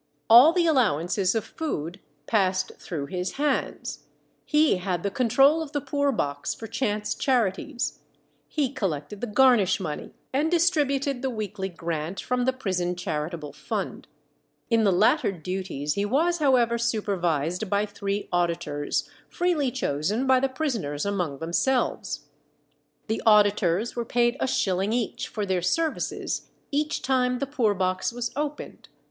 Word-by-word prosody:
All 250 Hz, +7 st, +10 dB
the 345 Hz, 0 st, +2 dB
allowances 195 Hz, -, +2 dB
of 220 Hz, -, 0 dB
food 185 Hz, -, -4 dB, 0.3 s
passed 190 Hz, -2 st, +1 dB
through 155 Hz, -5 st, -4 dB
his 180 Hz, +3 st, -3 dB
hands; 295 Hz, +1 st, -2 dB, 0.4 s
he 300 Hz, -7 st, +3 dB
had 180 Hz, -2 st, -2 dB
the 200 Hz, -, -1 dB
control 270 Hz, +8 st, +4 dB
of 305 Hz, -3 st, -7 dB
the 290 Hz, -, +1 dB
poor 285 Hz, 0 st, 0 dB
box 145 Hz, -, -2 dB
for 225 Hz, -, -8 dB
chance 215 Hz, -2 st, -1 dB
charities, 245 Hz, +1 st, -1 dB, 0.5 s
he 285 Hz, -5 st, -1 dB
collected 195 Hz, -, -3 dB
the 245 Hz, -, -2 dB
garnish 215 Hz, -4 st, +4 dB
money, 155 Hz, -6 st, -5 dB, 0.2 s
and 295 Hz, +4 st, +2 dB
distributed 290 Hz, -6 st, +1 dB
the 265 Hz, -, -1 dB
weekly 210 Hz, -4 st, -4 dB
grant 170 Hz, 0 st, -4 dB
from 250 Hz, 0 st, -1 dB
the 260 Hz, -, +3 dB
prison 185 Hz, -8 st, -2 dB
charitable 155 Hz, -2 st, -4 dB
fund. 210 Hz, -4 st, -4 dB, 0.6 s
In 225 Hz, -1 st, +4 dB
the 200 Hz, -, +4 dB
latter 195 Hz, +2 st, +3 dB
duties 180 Hz, -4 st, -3 dB
he 200 Hz, -, -1 dB
was, 320 Hz, +11 st, +1 dB
however, 245 Hz, -5 st, +3 dB
supervised 185 Hz, -6 st, -1 dB
by 205 Hz, +1 st, +2 dB
three 200 Hz, 0 st, -3 dB
auditors, 170 Hz, -4 st, -1 dB, 0.2 s
freely 340 Hz, -6 st, +1 dB
chosen 195 Hz, -, -1 dB
by 260 Hz, -1 st, +5 dB
the 270 Hz, +1 st, +1 dB
prisoners 230 Hz, -, -2 dB
among 180 Hz, -8 st, -1 dB
themselves. 175 Hz, -, 0 dB, 0.8 s
The 220 Hz, 0 st, -2 dB
auditors 205 Hz, -1 st, +3 dB
were 240 Hz, -, -1 dB
paid 240 Hz, +1 st, +2 dB
a -, -, 0 dB
shilling 195 Hz, -4 st, 0 dB
each 240 Hz, -2 st, -2 dB
for 210 Hz, -2 st, -3 dB
their 185 Hz, -2 st, 0 dB
services 320 Hz, -, -1 dB, 0.2 s
each 300 Hz, +1 st, -1 dB
time 250 Hz, -1 st, +2 dB
the 275 Hz, -, -2 dB
poor 245 Hz, -7 st, +1 dB
box 185 Hz, +2 st, 0 dB
was 240 Hz, 0 st, -3 dB
opened. 295 Hz, 0 st, -5 dB
215 Hz, 145 wpm, -26 LUFS, 180-265 Hz, 0.8 s, All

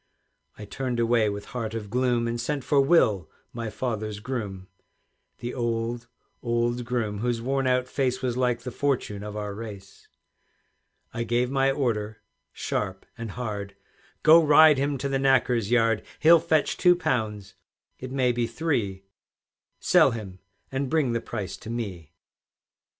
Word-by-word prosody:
I 105 Hz, -, -8 dB
turned 125 Hz, +3 st, -3 dB
away 115 Hz, -2 st, +3 dB
with 100 Hz, 0 st, -5 dB
heart 115 Hz, -3 st, -3 dB
of 105 Hz, -3 st, -6 dB
gloom, 125 Hz, -1 st, +1 dB
And 115 Hz, 0 st, -2 dB
sent 140 Hz, +2 st, -2 dB
for 140 Hz, 0 st, +3 dB
Will, 115 Hz, -, +3 dB, 0.2 s
my 115 Hz, -2 st, -4 dB
father's 110 Hz, -2 st, -3 dB
groom, 105 Hz, -6 st, -5 dB, 0.7 s
The 120 Hz, 0 st, -5 dB
old, 115 Hz, -1 st, -2 dB, 0.3 s
old 120 Hz, 0 st, 0 dB
groom, 115 Hz, -4 st, -2 dB
whose 120 Hz, +1 st, -1 dB
worn 135 Hz, +2 st, -1 dB
out 125 Hz, 0 st, +1 dB
face 130 Hz, -1 st, -1 dB
Was 125 Hz, -2 st, -2 dB
like 125 Hz, -2 st, 0 dB
the 125 Hz, -, -5 dB
fortune 125 Hz, -7 st, -1 dB
of 105 Hz, 0 st, -6 dB
our 105 Hz, -1 st, -4 dB
race. 100 Hz, -2 st, -10 dB, 1.1 s
I 115 Hz, -, -3 dB
gave 120 Hz, +2 st, 0 dB
my 135 Hz, 0 st, +2 dB
order 110 Hz, -6 st, -2 dB, 0.3 s
sharp 95 Hz, -2 st, -3 dB
and 115 Hz, -2 st, -6 dB
hard, 100 Hz, -3 st, -5 dB, 0.5 s
"Go, 165 Hz, +1 st, +8 dB
ride 150 Hz, -1 st, +7 dB
him 140 Hz, 0 st, 0 dB
to 140 Hz, -, -3 dB
the 135 Hz, -1 st, 0 dB
knacker's 125 Hz, -5 st, +2 dB
yard; 115 Hz, -2 st, +2 dB
He'll 165 Hz, +1 st, +7 dB
fetch 160 Hz, -2 st, +1 dB
two 180 Hz, -1 st, +5 dB
pounds, 110 Hz, -, -2 dB, 0.5 s
it 130 Hz, 0 st, -7 dB
may 130 Hz, -2 st, +2 dB
be 120 Hz, -1 st, -1 dB
three; 115 Hz, -8 st, -2 dB, 0.8 s
Sell -, -, +5 dB
him, 100 Hz, -5 st, -7 dB, 0.3 s
and 135 Hz, 0 st, -2 dB
bring 150 Hz, -5 st, +1 dB
the 115 Hz, 0 st, -1 dB
price 100 Hz, -2 st, -5 dB
to 110 Hz, -, -10 dB
me." 95 Hz, -9 st, -5 dB
120 Hz, 155 wpm, -26 LUFS, 105-130 Hz, 1.1 s, Go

